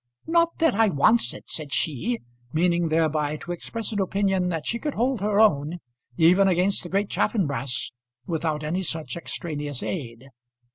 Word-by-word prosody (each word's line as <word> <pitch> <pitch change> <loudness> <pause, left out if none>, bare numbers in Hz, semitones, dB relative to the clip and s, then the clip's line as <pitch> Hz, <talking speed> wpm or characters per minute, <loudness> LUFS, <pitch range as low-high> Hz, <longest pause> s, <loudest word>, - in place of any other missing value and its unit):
"Not 335 0 +2
that 325 -1 +3
I 220 +1 +4
wants 205 +9 +3
it," - - -10
said 150 -3 -5
she, 125 -7 -1 0.3
meaning 170 +1 +2
thereby 155 -2 +1
to 175 - -7
express 225 +6 -4
an 210 - -2
opinion 190 -1 +1
that 165 -4 -3
she 235 - -1
could 295 +1 -3
hold 250 -2 0
her 205 0 +1
own, 160 -6 +3 0.4
even 180 +4 +5
against 185 +2 +2
the 175 - -8
great 200 +2 +1
Chaffanbrass, 140 - 0 0.3
without 155 -1 -2
any 165 +5 -1
such 160 -3 -2
extraneous 150 -5 -4
aid. 130 -6 -5
175 Hz, 160 wpm, -25 LUFS, 150-200 Hz, 0.4 s, even